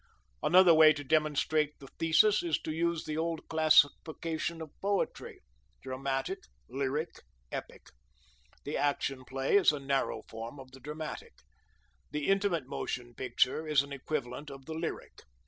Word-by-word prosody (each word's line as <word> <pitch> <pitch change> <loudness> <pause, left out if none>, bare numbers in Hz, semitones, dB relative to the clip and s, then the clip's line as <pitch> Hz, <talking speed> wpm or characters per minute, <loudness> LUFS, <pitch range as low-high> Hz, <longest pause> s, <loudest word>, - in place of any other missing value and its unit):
Another 180 +1 +6
way 155 -1 +8
to 145 0 -6
demonstrate 150 0 +1
the 140 - -13
thesis 200 +6 +4
is 170 -3 0
to 155 - -3
use 170 +1 -1
the 155 0 -3
old 165 0 -2
classification 160 +1 +2
of 160 -2 -8
poetry: 200 0 -2 0.4
dramatic, 135 +1 -2 0.3
lyric, 140 +4 -3 0.3
epic. - - -7 0.8
The 145 - -3
Action 135 -2 -1
Play 135 +8 +1
is 195 - +5
a 150 - -4
narrow 135 0 -1
form 115 +5 -8
of 130 -1 -12
the 130 - -13
dramatic. 150 +3 -7 0.8
The 150 +2 -2
Intimate 195 -7 +1
Motion 120 -2 -5
Picture 130 +5 0
is 150 -3 +4
an 140 0 -9
equivalent 140 0 -4
of 135 -1 -10
the 160 - -6
lyric. 160 +1 -5
150 Hz, 145 wpm, -31 LUFS, 135-160 Hz, 0.8 s, way